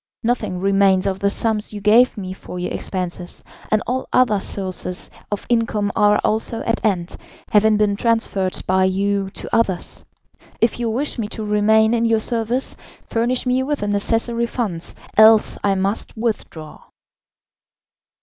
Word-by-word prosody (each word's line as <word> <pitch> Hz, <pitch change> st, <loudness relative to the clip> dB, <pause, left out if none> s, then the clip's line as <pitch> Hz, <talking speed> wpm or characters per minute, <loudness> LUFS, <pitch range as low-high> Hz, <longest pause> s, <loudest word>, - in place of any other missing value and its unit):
Nothing 235 Hz, -6 st, -1 dB
remains 195 Hz, 0 st, +3 dB
of 190 Hz, -1 st, -1 dB
the 200 Hz, -, +2 dB
sums 215 Hz, 0 st, +1 dB
you 210 Hz, -, -5 dB
gave 220 Hz, +5 st, +4 dB
me 185 Hz, -2 st, -5 dB
for 180 Hz, -, -9 dB
your 180 Hz, -, -3 dB
expenses, 180 Hz, -1 st, -4 dB, 0.3 s
and 215 Hz, 0 st, +1 dB
all 255 Hz, +2 st, -3 dB
other 225 Hz, -5 st, +3 dB
sources 185 Hz, -2 st, -3 dB, 0.2 s
of 205 Hz, -, -3 dB
income 225 Hz, -3 st, 0 dB
are 210 Hz, 0 st, +4 dB
also 225 Hz, +1 st, -1 dB
at 230 Hz, +1 st, -2 dB
end, 185 Hz, -5 st, -1 dB, 0.4 s
having 215 Hz, 0 st, +4 dB
been 210 Hz, -1 st, +2 dB
transferred 205 Hz, -4 st, 0 dB
by 185 Hz, 0 st, +2 dB
you 195 Hz, +1 st, 0 dB
to -, -, -4 dB
others. 195 Hz, -6 st, 0 dB, 0.6 s
If 230 Hz, +1 st, +1 dB
you 235 Hz, -1 st, -1 dB
wish 260 Hz, +3 st, -2 dB
me 215 Hz, -, -2 dB
to 220 Hz, 0 st, -6 dB
remain 220 Hz, +2 st, +3 dB
in 235 Hz, 0 st, +1 dB
your 225 Hz, -1 st, +3 dB
service, 235 Hz, +3 st, -1 dB, 0.4 s
furnish 240 Hz, +3 st, 0 dB
me 250 Hz, +1 st, +1 dB
with 285 Hz, +2 st, -2 dB
the 205 Hz, -, -1 dB
necessary 230 Hz, +3 st, 0 dB
funds, 200 Hz, -9 st, -3 dB, 0.2 s
else 220 Hz, 0 st, +6 dB
I 200 Hz, -1 st, +2 dB
must 195 Hz, +4 st, -2 dB
withdraw." 210 Hz, -9 st, -4 dB
210 Hz, 155 wpm, -20 LUFS, 195-230 Hz, 0.6 s, else